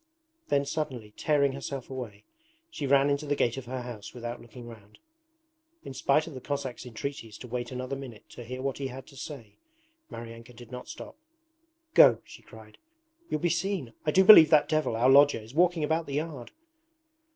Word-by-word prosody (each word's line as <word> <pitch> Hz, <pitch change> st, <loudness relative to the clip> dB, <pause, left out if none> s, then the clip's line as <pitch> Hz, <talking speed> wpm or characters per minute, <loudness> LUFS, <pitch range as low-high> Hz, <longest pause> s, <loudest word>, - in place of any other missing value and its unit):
Then, 140 Hz, 0 st, +1 dB
suddenly 130 Hz, -8 st, -4 dB
tearing 145 Hz, -2 st, +2 dB
herself 135 Hz, -1 st, -6 dB
away, 115 Hz, -6 st, -8 dB, 0.5 s
she 145 Hz, -, -4 dB
ran 140 Hz, +1 st, +4 dB
into 140 Hz, +1 st, -2 dB
the 145 Hz, -, +1 dB
gate 120 Hz, -4 st, +1 dB
of 135 Hz, -, -6 dB
her 130 Hz, 0 st, -5 dB
house 115 Hz, -3 st, -9 dB
without 120 Hz, 0 st, -6 dB
looking 120 Hz, +1 st, -12 dB
round. 110 Hz, -3 st, -14 dB, 0.9 s
In -, -, -8 dB
spite 140 Hz, +3 st, +2 dB
of 165 Hz, -, -9 dB
the 130 Hz, -, -8 dB
Cossack's 135 Hz, -3 st, -5 dB
entreaties 115 Hz, -2 st, -6 dB
to 125 Hz, -, -10 dB
wait 120 Hz, 0 st, -4 dB
another 130 Hz, +1 st, -4 dB
minute 130 Hz, -6 st, -10 dB
to 120 Hz, -, -10 dB
hear 130 Hz, +2 st, -7 dB
what 135 Hz, 0 st, -3 dB
he 135 Hz, -, -2 dB
had 130 Hz, +1 st, -9 dB
to 140 Hz, -, -17 dB
say, 135 Hz, -5 st, -9 dB, 0.5 s
Maryanka 115 Hz, +1 st, -10 dB
did 120 Hz, +1 st, -13 dB
not 125 Hz, 0 st, -8 dB
stop. -, -, -10 dB, 0.8 s
'Go,' 115 Hz, -5 st, +7 dB
she -, -, -13 dB
cried, 110 Hz, -1 st, -16 dB, 0.5 s
'you'll 155 Hz, -, -2 dB
be 175 Hz, -, +1 dB
seen! 175 Hz, -, -2 dB
I -, -, 0 dB
do 190 Hz, +5 st, +5 dB
believe 185 Hz, -6 st, +10 dB
that 150 Hz, -2 st, +5 dB
devil, 155 Hz, -7 st, 0 dB
our 120 Hz, +3 st, +2 dB
lodger, 140 Hz, +2 st, +6 dB
is 110 Hz, +3 st, -13 dB
walking 170 Hz, 0 st, +2 dB
about 160 Hz, +2 st, 0 dB
the 140 Hz, -, -4 dB
yard.' 150 Hz, -5 st, -4 dB
130 Hz, 190 wpm, -28 LUFS, 120-145 Hz, 0.9 s, believe